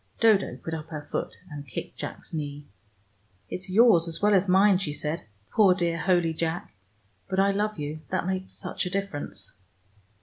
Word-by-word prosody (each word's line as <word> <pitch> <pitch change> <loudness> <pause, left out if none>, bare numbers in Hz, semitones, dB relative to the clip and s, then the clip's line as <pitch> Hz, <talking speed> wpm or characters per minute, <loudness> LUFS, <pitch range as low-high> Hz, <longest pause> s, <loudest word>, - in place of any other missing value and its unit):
Dodo 220 -4 +4
put 165 - -6
up 160 -1 -5
her 155 -2 -6
foot, - - -3
and 145 -1 -7
kicked 115 - -6
Jack's - - -6
knee. 145 -2 -4 0.9
"It's 190 +1 -5
yours, 195 -4 +6
as 165 - 0
well 210 0 +4
as 190 -1 +3
mine," 190 +1 +5
she 155 -6 -2
said. 150 +2 -2 0.3
"Poor 195 -4 +5
dear 170 -2 0
holy 175 -2 +2
Jack. 165 -6 -3 0.6
But 190 - 0
I 200 +1 +4
love 210 +1 -1
you; 150 +1 -4
that 185 -1 -1
makes 190 0 -2
such - - -3
a - - -2
difference." 155 - -4
175 Hz, 175 wpm, -27 LUFS, 155-195 Hz, 0.9 s, yours